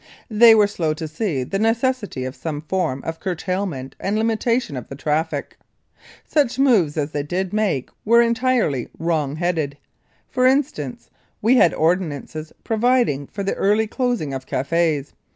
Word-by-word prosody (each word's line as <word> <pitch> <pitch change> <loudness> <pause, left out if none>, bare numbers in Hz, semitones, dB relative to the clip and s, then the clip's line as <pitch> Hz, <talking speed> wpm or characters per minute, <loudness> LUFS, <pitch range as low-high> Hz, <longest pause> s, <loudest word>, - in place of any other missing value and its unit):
They 225 +1 +8
were 210 -1 +5
slow 165 -6 -1
to 160 +1 -5
see 155 - -2
the 195 +10 -3
necessity 225 - 0
of 130 +2 -5
some 150 -3 -4
form 160 -5 -2
of 165 0 -5
curtailment 180 -6 -3
and 200 +2 -1
limitation 225 - 0
of 125 - -6
the 135 - -8
traffic. 150 +1 -2 0.7
Such 285 -6 +1
moves 215 - +3
as 150 0 -1
they 145 - -1
did 180 +6 -3
make 205 - 0
were 235 +2 +5
entirely 235 - +1
wrong 155 -4 -1
headed. 160 -4 -1 0.5
For 255 0 +2
instance, 255 - -1 0.3
we 240 +5 +4
had 175 - +5
ordinances 155 -2 -1
providing 225 - +1
for 200 - -5
the 195 - 0
early 210 +3 +2
closing 240 - -1
of 130 -1 -6
cafés. 150 0 0
180 Hz, 150 wpm, -21 LUFS, 150-225 Hz, 0.7 s, They